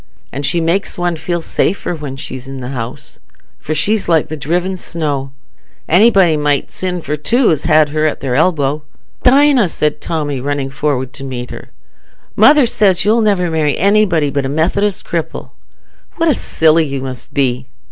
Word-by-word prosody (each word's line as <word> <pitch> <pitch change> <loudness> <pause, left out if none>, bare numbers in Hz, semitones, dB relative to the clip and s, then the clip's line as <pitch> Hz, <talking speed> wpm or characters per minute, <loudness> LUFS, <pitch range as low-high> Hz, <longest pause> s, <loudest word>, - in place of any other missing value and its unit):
An' 135 - -5
she 150 +4 +1
makes 170 +4 -1
one 175 -1 -1
feel 170 +2 -3
safer 180 +2 -1
when 150 -5 -6
she's 130 -1 -7
i' - - -7
the 130 -2 -6
house, 125 -3 -7 0.4
for 155 - -4
she's 210 +2 +1
like 160 -3 +2
the 155 - -4
driven 175 +6 -2
snow: 145 -6 -3 0.6
anybody 190 -2 +4
might 145 -1 0
sin 180 -1 -3
for 150 -1 -3
two 230 - +2
as 155 - -1
had 155 -1 +4
her 155 +1 0
at 150 - -3
their 130 -3 -3
elbow." 150 -1 +1 0.4
"Dinah," 265 -5 +4
said 150 -1 -1
Tommy, 145 -5 -3
running 140 0 -2
forward 135 -2 -2
to - - -8
meet 125 -2 -6
her, - - -9 0.7
"mother 280 +6 +6
says 200 -6 +2
you'll 225 +3 +3
never 195 -5 +1
marry 155 -2 0
anybody 190 -7 +2
but 140 0 -1
a 135 - -3
Methodist 185 +7 0
cripple. 165 -2 -4 0.6
What 330 - 0
a 310 - +4
silly 160 - +2
you 135 -1 -4
must 130 -2 -7
be!" 130 -2 -1
155 Hz, 175 wpm, -15 LUFS, 140-185 Hz, 0.7 s, mother